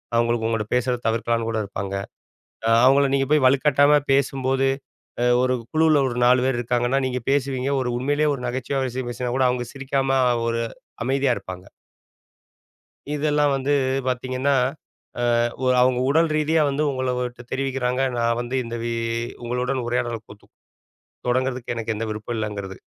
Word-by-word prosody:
அவங்களுக்கு 115 -1 +1
உங்கிட்ட 115 -2 -1
பேசுறத 125 0 0
தவிர்க்கலான்னு 115 0 0
கூட 115 -1 -1
இருப்பாங்க. 100 0 -5 0.7
அ, - - +2 0.2
அவங்கள 140 +2 +5
நீங்க 135 0 +2
போய் 150 -3 +4
வலுக்கட்டாயமா 145 +2 +4
பேசும்போது, 135 0 +1 0.5
அ, - - +2 0.2
ஒரு 130 0 +2 0.2
குழுவுல 155 -2 +4
ஒரு 120 - -5
4 125 +1 +4
பேரு 130 -2 +1
இருக்கிறாங்கன்னா, 120 +2 +1
நீங்க 125 -1 -3
பேசுவீங்க. 135 -1 0
ஒரு 125 -1 -1
உண்மையிலேயே 145 +4 +1
ஒரு 125 - -8
நகைச்சுவையான 130 +2 -2
விஷயம் 125 0 -4
பேசினா 125 0 -3
கூட, 130 - +3
அவங்க 125 0 -1
சிரிக்காம 135 0 0 0.9
அமைதியா 135 0 +2
இருப்பாங்க. 90 0 -8 1.5
இதெல்லாம் 150 0 +2
வந்து 135 +1 0 0.4
பார்த்தீங்கன்னா, 130 +2 0 1.1
அ - - +1 0.2
அவங்க 125 0 +3
உடல் 160 +3 +3
ரீதியா 155 +1 +2
வந்து 140 +2 0
உங்களுட்ட 125 -2 -3
தெரிவிக்கிறாங்க. 130 -1 -1 0.2
நான் 115 0 +1
வந்து 120 +2 -4
இந்த 115 0 -6
வி 120 0 -2 0.5
உங்களுடன் 125 +2 -1
உரையாடல் 120 -2 -2
கொத்து 105 0 -15 0.8
தொடங்கறதுக்கு 125 0 -1
எனக்கு 115 -1 -2
எந்த 110 +1 -3
விருப்பம் 110 +2 -4
இல்லங்கிறது. 100 -3 -4
130 Hz, 140 wpm, -23 LUFS, 120-135 Hz, 1.5 s, அவங்கள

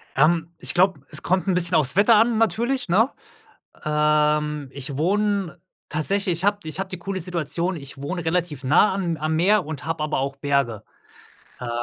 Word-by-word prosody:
Ähm, 165 +3 +2
ich - - -2
glaube, 185 -4 +2
es - - -2
kommt 185 +2 0
'n 190 - +2
bisschen 175 0 +1
aufs 145 -1 +3
Wetter 205 +4 +6
an, 225 +1 +3
natürlich, 235 +2 0
ne? 220 +9 +4 0.7
Ähm, 150 -1 +1
ich 135 0 -7
wohne 195 +1 0 0.3
tatsächlich 185 +5 0
ich 185 - -2
habe 205 0 +2
ich 155 +1 -7
habe 195 0 -3
die 185 - -7
coole 190 +2 -4
Situation, 175 +1 -2
ich 140 -4 -10
wohne 175 +5 -4
relativ 160 -4 -1
nah 155 +9 +4
am 175 -4 -2
am 155 +1 -1
Meer 190 +4 +3
und 150 -2 -6
habe 165 -1 -2
aber 155 -2 -1
auch 135 +1 -2
Berge. 135 -6 -1 0.8
Ähm, 125 - -5
170 Hz, 185 wpm, -23 LUFS, 150-190 Hz, 0.8 s, Wetter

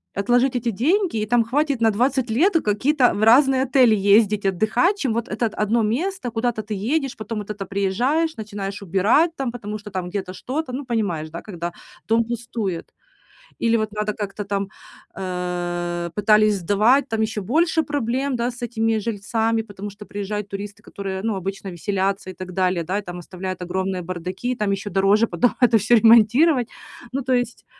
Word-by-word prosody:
отложить 245 +5 +2
эти 235 -1 0
деньги, 325 - +1
и 215 - 0
там 235 +1 +3
хватит 280 +1 0
на 225 - +4
20 255 +3 +1
лет 320 - +3
какие-то 250 +6 +2
в 205 - -3
разные 260 +3 +5
отели 255 -4 +4
ездить, 205 +1 +3
отдыхать, 220 - +2
чем 265 - -1
вот 235 +1 -2
это 225 +2 0
1 215 +2 0
место, 260 - -2
куда-то 225 -1 -1
ты 210 +1 -5
едешь, 270 +6 -1
потом 215 0 -5
вот 210 0 -8
это 205 -2 -5
приезжаешь, 240 - 0
начинаешь 205 -1 -5
убирать 200 - +3
там, 265 -3 -2
потому 215 -3 -6
что 210 0 -11
там 185 -2 -3
где-то 185 -1 -4
что-то, 260 +7 -4
ну, 275 +1 -4
понимаешь, 200 -10 -2
да, 170 +2 -7
когда 175 -4 -6 0.3
дом 225 +1 +3
пустует. 230 -6 -4 0.7
Или 230 0 +2
вот 215 -1 -2
надо 210 0 -2
как-то 205 0 -5
там, 200 -1 -2 0.5
э, 175 -2 -3
пытались 210 0 +4
сдавать, 215 +10 +3
там 225 -1 -1
еще 220 -1 -1
больше 320 - +2
проблем, 270 -1 -1
да, 240 +1 -1
с 245 0 -13
этими 225 -2 0
жильцами, 225 +1 -1
потому 205 -1 -8
что 205 +1 -12
приезжают 205 0 -4
туристы, 200 +1 -7
которые, 190 -1 -5
ну, 225 -3 0
обычно 195 +1 -5
веселятся 195 +1 -2
и - - -11
так 185 +1 -8
далее, 180 -2 +1
да, 190 +5 -1
и - - -5
там 175 -1 -7
оставляют 185 +1 -6
огромные 185 +1 -2
бардаки, 185 +7 -4
там 210 -4 -1
еще 195 +1 -3
дороже 200 +4 +3
потом 245 +1 +2
это 240 -2 +6
всё 220 +3 +3
ремонтировать. 235 +5 +5 0.4
Ну, 275 +2 -2
то 260 0 0
есть, 245 -1 -1
215 Hz, 180 wpm, -22 LUFS, 195-245 Hz, 0.7 s, это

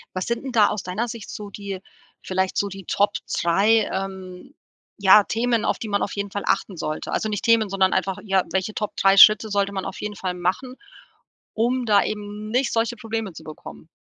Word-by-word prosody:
Was 185 - -2
sind 235 +2 -2
denn 265 - -5
da 215 -4 +5
aus 210 - -4
deiner 195 +7 -3
Sicht 230 -2 -8
so 205 -1 -7
die 200 -2 -6 0.4
vielleicht 190 0 -2
so 200 - +1
die 195 -2 -9
Top 205 +1 +1 0.3
3, 200 +6 +3
ähm, 190 +3 -6 0.4
ja 200 +1 +7
Themen, 230 +1 0
auf - - 0
die 220 - -5
man 200 -1 0
auf - - -4
jeden 200 -1 -4
Fall 205 - -4
achten 195 -1 -1
sollte? 155 -1 -4
Also 220 - -1
nicht 205 -2 -3
Themen, 230 -3 +4
sondern 190 -1 +2
einfach 195 -1 -1
ja, 190 -3 +2
welche 190 +4 -1
Top 210 -1 -4
3 195 0 +4
Schritte 215 +2 +8
sollte 200 -1 0
man 190 -1 -4
auf 190 - -6
jeden 210 0 -5
Fall 185 -2 -3
machen, 185 +9 -2 0.8
um 245 +2 0
da 205 -2 +4
eben 210 0 -5
nicht 250 +2 0
solche 230 +1 0
Probleme 225 -3 -4
zu - - -11
bekommen? 75 - -11
205 Hz, 210 wpm, -23 LUFS, 190-220 Hz, 0.8 s, Schritte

